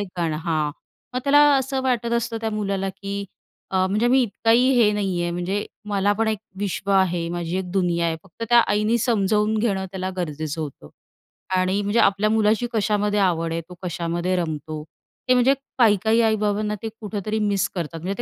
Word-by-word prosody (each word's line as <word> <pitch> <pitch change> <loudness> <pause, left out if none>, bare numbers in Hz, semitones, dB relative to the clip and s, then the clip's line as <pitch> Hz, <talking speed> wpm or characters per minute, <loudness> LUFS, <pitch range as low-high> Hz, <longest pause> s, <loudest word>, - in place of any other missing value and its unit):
एक 205 - -2
गाणं 165 -3 0
हां, 155 -3 0 0.4
मग 255 - 0
त्याला 285 +1 +5 0.2
असं 265 0 -1
वाटत 240 -3 0
असतं 235 0 -1
त्या 225 0 -2
मुलाला 200 -2 -2
की 200 +1 -5 0.5
अ, 185 -1 +2
म्हणजे 210 +5 +1
मी 260 +2 +5
इतकाही 230 +2 +2
हे 230 -4 +5
नाहीये, 185 -4 -1
म्हणजे 180 +4 -2 0.2
मला 200 0 +2
पण 225 0 +2
एक 215 - 0 0.2
विश्व 200 0 -3
आहे, 180 -3 +2
माझी 175 +1 -3
एक 180 -2 -5
दुनिया 175 -3 +1
आहे. 160 - -1
फक्त 195 +4 -13
त्या 240 - +6
आईने 210 0 +2
समजावून 215 -1 +1
घेणं 195 -4 0
त्याला 185 0 -4
गरजेचं 155 -2 -3
होतं 140 - -7 0.7
आणि 185 +2 +1
म्हणजे 205 +3 0
आपल्या 200 +2 +3
मुलाची 220 +2 +2
कशामध्ये 210 -1 +1
आवड 165 -3 +1
आहे, 165 - -1
तो 180 - -10
कशामध्ये 175 +1 -2
रमतो 155 -2 -4 0.5
ते, 255 - +6
म्हणजे 250 +2 +4 0.2
काही-काही 220 0 +4
आई-बाबांना 210 -1 +1
ते 225 - -2
कुठेतरी 215 0 -3
मिस 205 -3 +1
करतात, 165 -2 -4
म्हणजे 185 +4 -3
200 Hz, 180 wpm, -23 LUFS, 175-220 Hz, 0.7 s, त्या